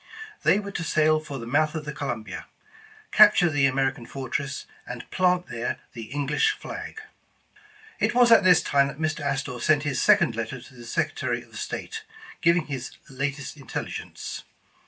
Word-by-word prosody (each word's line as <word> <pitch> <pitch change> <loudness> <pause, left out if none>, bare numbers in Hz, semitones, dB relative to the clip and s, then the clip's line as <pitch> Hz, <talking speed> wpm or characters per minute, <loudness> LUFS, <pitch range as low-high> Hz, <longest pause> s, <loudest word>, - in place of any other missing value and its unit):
They - - +4
were 200 -1 -6
to 175 - -3
sail 155 0 +3
for 150 -3 -7
the 115 - -6
mouth 150 +6 +1
of 155 -1 -4
the 150 - -4
Columbia, 120 -6 -5 0.6
capture 205 -5 +7
the 145 -2 +3
American 135 -2 -1
fortress, 140 +1 -4 0.2
and 125 -1 -7
plant 180 -1 +2
there 120 -3 -3 0.2
the 115 -2 -7
English 145 - +1
flag. - - -7 1.0
It - - +1
was 245 -1 +6
at 225 -3 +8
this 180 -3 +6
time 140 -1 +3
that 140 - -7
Mr. 155 0 -1
Astor 135 -3 -2
sent 145 +3 +3
his 135 -4 -1
second 190 - +4
letter 115 +3 -4
to 125 +2 -15
the 120 -2 -12
Secretary - - -1
of - - -18
State, - - -5 0.4
giving 170 -1 +4
this 135 -4 -6
latest 140 +1 -3
in 135 - -14
telligence. - - -5
145 Hz, 170 wpm, -26 LUFS, 130-165 Hz, 1.0 s, at